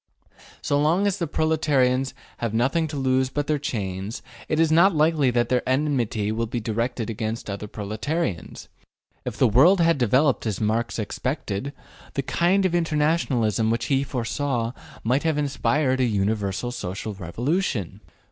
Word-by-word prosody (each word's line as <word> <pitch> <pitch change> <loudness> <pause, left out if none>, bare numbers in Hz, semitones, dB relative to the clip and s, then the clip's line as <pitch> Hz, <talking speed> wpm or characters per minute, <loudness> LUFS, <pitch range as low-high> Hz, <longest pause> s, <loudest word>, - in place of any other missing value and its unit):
So 145 0 +1
long 170 +7 +2
as 200 -1 0
the 170 - -1
proletarians 140 -5 +1 0.2
have 115 -2 -2
nothing 135 +8 +1
to 150 -1 -6
lose 130 -1 +1
but 145 +2 -2
their 150 0 0
chains, 100 -6 -4 0.3
it 155 - +1
is 165 -1 +3
not 170 +3 +5
likely 155 -3 +3
that 120 -1 +1
their 125 -1 +2
enmity 130 -7 0
will 115 +1 -1
be 120 +2 -3
directed 115 +1 -2
against 110 0 -4
other 100 +1 -5
proletarians. 105 - -4 0.6
If - - -4
the 130 - +4
world 150 - +5
had 165 -3 +3
developed 130 +2 +2
as 105 -4 -2
Marx 110 +2 0
expected, 125 +2 -3 0.4
the 140 - 0
kind 185 +7 +2
of 185 - +1
internationalism 150 - +1
which 115 +1 0
he 135 0 +2
foresaw 125 -1 -2 0.3
might 125 +5 +2
have 160 -2 0
inspired 140 -1 +1
a - - +3
universal 105 +1 -1
social 105 -1 -5
revolution. 105 - -2
130 Hz, 155 wpm, -24 LUFS, 110-150 Hz, 0.6 s, not